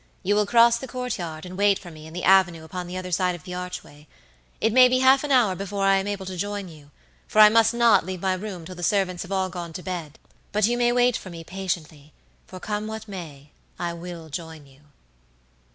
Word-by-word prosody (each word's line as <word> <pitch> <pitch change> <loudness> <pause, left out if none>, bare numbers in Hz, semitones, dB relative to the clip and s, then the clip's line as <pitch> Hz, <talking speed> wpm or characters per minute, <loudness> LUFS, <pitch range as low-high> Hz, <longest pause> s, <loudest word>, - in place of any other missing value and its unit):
You 205 - +2
will 210 0 +2
cross 235 +1 +5
the 265 - -7
courtyard 185 -12 -5
and 180 0 -8
wait 200 0 +3
for 175 - -12
me 155 0 -12
in 160 - -12
the 180 - -5
avenue 175 -3 +4
upon 180 +2 -6
the 180 +1 -6
other 185 0 -6
side 180 0 +1
of 175 - -12
the 180 - -8
archway. 180 -4 -8 0.5
It 220 0 +1
may 255 0 +8
be 255 +1 +2
half 265 +2 +5
an 295 - -3
hour 240 -7 +4
before 195 +1 -4
I 195 0 +5
am 195 +1 -2
able 200 -2 -4
to 185 -1 -6
join 205 0 -4
you, 150 -3 -15 0.4
for - - -6
I 210 0 +10
must 225 0 +4
not 235 -2 +4
leave 185 +1 -5
my 190 +1 0
room 185 -3 -6
till 185 - -8
the 175 - -10
servants 185 0 0
have 185 - -8
all 190 -1 0
gone 175 -2 -7
to 180 +2 -7
bed, 170 -5 -6 0.3
but 210 0 +2
you 240 +2 +1
may 240 0 +2
wait 245 0 +3
for 185 - -10
me 165 -2 -9
patiently, 165 -5 -5 0.3
for 185 - -10
come 210 +2 -3
what 220 0 -7
may 150 -7 -9 0.3
I 170 -1 -3
will 170 -1 -9
join 160 -1 -7
you." 135 0 -20
185 Hz, 235 wpm, -24 LUFS, 170-210 Hz, 0.5 s, I